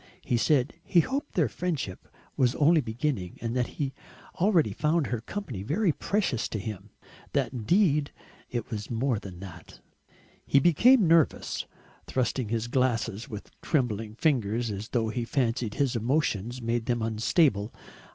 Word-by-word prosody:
He - - 0
said 130 +2 +2
he 175 - +4
hoped 275 - -4
their 160 -7 +3
friendship 145 - -4 0.3
was 125 0 +2
only 155 +2 +4
beginning, 115 -5 -3
that 120 +1 -1
he 135 -2 -2 0.5
already 180 -3 +3
found 155 0 +1
her 120 -4 -2
company 125 - -5
very 170 - +1
precious 190 - -1
to - - -4
him, 105 -1 -6 0.4
that - - 0
indeed 150 - +2 0.4
it 120 -1 -4
was 105 -1 -4
more 120 -1 0
than 90 -4 -10
that. 85 -5 -11 0.6
He 140 - +4
became 200 - +5
nervous, 165 -2 +2 0.4
thrusting 130 -1 -1
at - - -8
his 115 0 -1
glasses 120 -4 0
with 105 -2 -8
trembling 110 -7 -1
fingers 120 -5 +1
as 100 +2 -5
though 115 -3 0
he 120 +2 -2
fancied 115 -3 -1
his 135 -3 +1
emotions 120 -1 0
made 115 0 -1
them 120 -2 0
unstable. 110 - +2
120 Hz, 150 wpm, -28 LUFS, 110-150 Hz, 0.6 s, became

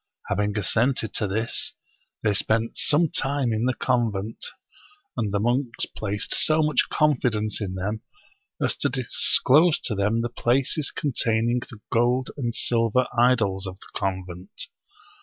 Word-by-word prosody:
Having 105 0 0
assented 115 +2 +1
to 105 - 0
this, 110 +5 -2 0.5
they 105 -2 +2
spent 110 +3 0
some 155 +1 +2
time 135 -4 0
in 110 +2 0
the 130 -1 +1
convent; 115 -4 -1 0.7
and 105 -3 -1
the 100 - 0
monks 120 +2 0
placed 105 -1 -3
so 155 0 +3
much 150 0 +2
confidence 120 -8 +1
in 95 -2 -3
them 105 +4 -3 0.6
as - - +1
to 140 - +1
disclose 135 +5 +3
to 115 - -2
them 105 +3 +1
the 120 - -2
places 130 +5 +1
containing 120 -4 0
the 115 -3 -11
gold 120 +2 +2
and 120 -5 -3
silver 115 +1 +2
idols 115 -6 +2
of 95 - -6
the - - -15
con 95 -1 -2
vent. 90 +1 -9
115 Hz, 145 wpm, -25 LUFS, 105-130 Hz, 0.7 s, so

